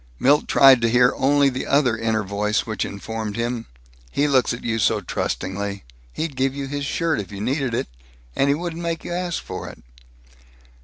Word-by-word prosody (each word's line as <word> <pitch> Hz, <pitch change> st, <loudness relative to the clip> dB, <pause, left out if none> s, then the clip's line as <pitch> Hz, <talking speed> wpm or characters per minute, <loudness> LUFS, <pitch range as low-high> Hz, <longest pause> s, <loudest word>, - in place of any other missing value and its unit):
Milt 145 Hz, -, +3 dB
tried 135 Hz, -3 st, +7 dB
to 115 Hz, -, +2 dB
hear 125 Hz, +1 st, +4 dB
only 140 Hz, +1 st, +3 dB
the 130 Hz, -1 st, -2 dB
other 140 Hz, -5 st, +3 dB
inner 110 Hz, -1 st, 0 dB
voice, 105 Hz, +2 st, -1 dB
which 110 Hz, -1 st, -2 dB
informed 110 Hz, +1 st, -5 dB
him, 120 Hz, 0 st, -3 dB, 0.4 s
"He 145 Hz, -, +1 dB
looks 135 Hz, -3 st, +3 dB
at 115 Hz, -, -5 dB
you 115 Hz, -1 st, -1 dB
so 100 Hz, -, +2 dB
trustingly. 100 Hz, +1 st, -3 dB, 0.3 s
He'd 155 Hz, -, -4 dB
give 135 Hz, +1 st, 0 dB
you 140 Hz, -1 st, -3 dB
his 140 Hz, 0 st, -3 dB
shirt, 165 Hz, -2 st, 0 dB
if 100 Hz, -3 st, -6 dB
you 100 Hz, -, -7 dB
needed 130 Hz, +2 st, -1 dB
it -, -, -2 dB, 0.5 s
and 140 Hz, -, +2 dB
he 140 Hz, -, +4 dB
wouldn't 170 Hz, +1 st, -5 dB
make 165 Hz, -1 st, -3 dB
you -, -, -4 dB
ask 175 Hz, -1 st, -2 dB
for -, -, -6 dB
it!" -, -, -14 dB
125 Hz, 195 wpm, -22 LUFS, 110-140 Hz, 0.5 s, tried